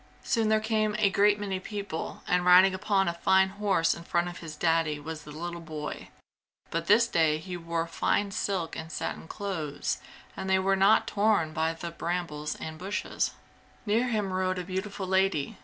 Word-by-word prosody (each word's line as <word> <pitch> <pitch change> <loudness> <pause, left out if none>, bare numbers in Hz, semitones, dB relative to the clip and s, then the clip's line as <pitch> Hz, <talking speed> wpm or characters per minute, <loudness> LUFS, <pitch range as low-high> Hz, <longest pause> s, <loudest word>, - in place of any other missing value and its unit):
Soon 225 -4 +1
there 215 0 +4
came 215 -1 0
a 205 -2 +3
great 205 0 +4
many 195 -2 -2
people, 200 -4 -5
and 180 0 +2
riding 180 +2 +7
upon 195 0 +1
a 170 - 0
fine 190 +2 +3
horse 195 -4 +1
in 170 - -9
front 175 0 0
of 175 - -9
his 160 -2 -8
Daddy 160 -2 +1
was 155 +1 -6
the 150 - -9
little 170 +2 -5
boy, 155 -2 -6 0.6
but 165 0 -2
this 230 +4 +6
day 160 -6 +2
he 180 +3 -6
wore 170 -1 -2
fine 200 +4 0
silk 185 -4 -2
and 160 0 -7
satin 155 - -4
clothes 165 -9 -3 0.4
and 190 - -4
they 190 - +4
were 195 +1 +2
not 195 +3 +5
torn 205 -7 +1
by 160 0 +1
the 170 +1 -6
brambles 165 -3 -3
and 160 0 -7
bushes. 195 +3 -2 0.5
Near 225 +4 +2
him 210 -5 -1
rode 185 0 0
a 180 - -3
beautiful 190 +2 -4
lady. 190 -6 +1
185 Hz, 185 wpm, -28 LUFS, 165-200 Hz, 0.6 s, riding